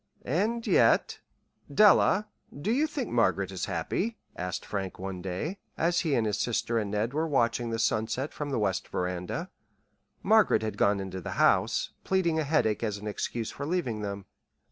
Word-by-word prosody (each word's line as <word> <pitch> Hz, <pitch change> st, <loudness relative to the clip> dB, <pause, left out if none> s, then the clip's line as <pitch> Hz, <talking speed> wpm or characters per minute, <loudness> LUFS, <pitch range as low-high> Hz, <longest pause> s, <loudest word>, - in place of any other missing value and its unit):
And 215 Hz, -, 0 dB
yet -, -, +3 dB, 0.5 s
"Della, 210 Hz, 0 st, +5 dB, 0.3 s
do 200 Hz, +9 st, -1 dB
you 290 Hz, +6 st, +2 dB
think 300 Hz, -, -4 dB
Margaret -, -, +1 dB
is -, -, -3 dB
happy?" 230 Hz, -1 st, -2 dB, 0.2 s
asked 90 Hz, 0 st, -4 dB
Frank 95 Hz, -2 st, -4 dB
one 95 Hz, -1 st, -5 dB
day, 95 Hz, -, -4 dB, 0.2 s
as 170 Hz, +2 st, +2 dB
he 155 Hz, -6 st, +1 dB
and 115 Hz, -, +1 dB
his 105 Hz, -, -1 dB
sister 115 Hz, -1 st, 0 dB
and 105 Hz, -2 st, -3 dB
Ned 105 Hz, +5 st, -1 dB
were 160 Hz, +2 st, 0 dB
watching 120 Hz, -4 st, +1 dB
the 115 Hz, -, -2 dB
sunset 115 Hz, +5 st, 0 dB
from 145 Hz, -1 st, -4 dB
the 135 Hz, -, -1 dB
west 95 Hz, -4 st, 0 dB
veranda. 90 Hz, 0 st, -3 dB, 0.7 s
Margaret 215 Hz, -, +4 dB
had 110 Hz, -, -3 dB
gone 100 Hz, 0 st, +2 dB
into 95 Hz, -1 st, -5 dB
the -, -, -5 dB
house, -, -, +3 dB
pleading 170 Hz, -4 st, +1 dB
a -, -, +1 dB
headache 140 Hz, -8 st, +1 dB
as 105 Hz, -3 st, -1 dB
an 105 Hz, -, -10 dB
excuse 110 Hz, +2 st, -3 dB
for 140 Hz, -, -5 dB
leaving 150 Hz, -11 st, -1 dB
them. 100 Hz, -1 st, -5 dB
115 Hz, 175 wpm, -28 LUFS, 100-165 Hz, 0.7 s, Della